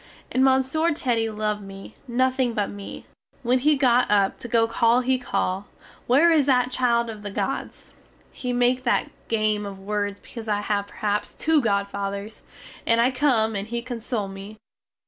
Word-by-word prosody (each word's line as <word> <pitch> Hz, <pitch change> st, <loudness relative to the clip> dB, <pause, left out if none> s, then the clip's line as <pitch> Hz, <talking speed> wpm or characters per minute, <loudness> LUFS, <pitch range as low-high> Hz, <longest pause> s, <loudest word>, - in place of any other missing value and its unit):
And 260 Hz, -, +2 dB
Monsieur 265 Hz, +5 st, +3 dB
Teddy 235 Hz, -7 st, 0 dB
love 210 Hz, -1 st, -2 dB
me, 195 Hz, +1 st, -10 dB
nothing 255 Hz, 0 st, +1 dB
but 205 Hz, -1 st, -1 dB
me. 200 Hz, -1 st, -9 dB, 0.4 s
When 250 Hz, +2 st, +2 dB
he 295 Hz, +3 st, +3 dB
get 250 Hz, -2 st, +3 dB
up 200 Hz, -2 st, +2 dB
to -, -, -7 dB
go 230 Hz, -1 st, +3 dB
away 235 Hz, +2 st, +2 dB
he 260 Hz, 0 st, +2 dB
call: 195 Hz, -5 st, -2 dB, 0.4 s
"Where 290 Hz, +8 st, +5 dB
is 300 Hz, -4 st, +3 dB
that 250 Hz, -2 st, +3 dB
child 235 Hz, -2 st, +2 dB
of 220 Hz, -2 st, -7 dB
the 205 Hz, -, -5 dB
gods?" 195 Hz, -, -4 dB, 0.4 s
(He 250 Hz, -, -4 dB
make 245 Hz, +1 st, +2 dB
that 245 Hz, -2 st, 0 dB, 0.2 s
game 215 Hz, -2 st, 0 dB
of 200 Hz, -1 st, -6 dB
words 205 Hz, 0 st, -3 dB
because 230 Hz, -2 st, -10 dB
I 205 Hz, -1 st, 0 dB
have 205 Hz, -1 st, -1 dB
perhaps 210 Hz, 0 st, -2 dB
two 315 Hz, -1 st, +2 dB
godfathers) 200 Hz, -1 st, -2 dB, 0.5 s
And 230 Hz, 0 st, +4 dB
I 240 Hz, +3 st, +4 dB
come, 250 Hz, -5 st, +2 dB
and 200 Hz, +1 st, -3 dB
he 235 Hz, +1 st, -4 dB
console 235 Hz, -3 st, -3 dB
me. 195 Hz, +2 st, -9 dB
230 Hz, 170 wpm, -24 LUFS, 205-255 Hz, 0.5 s, Where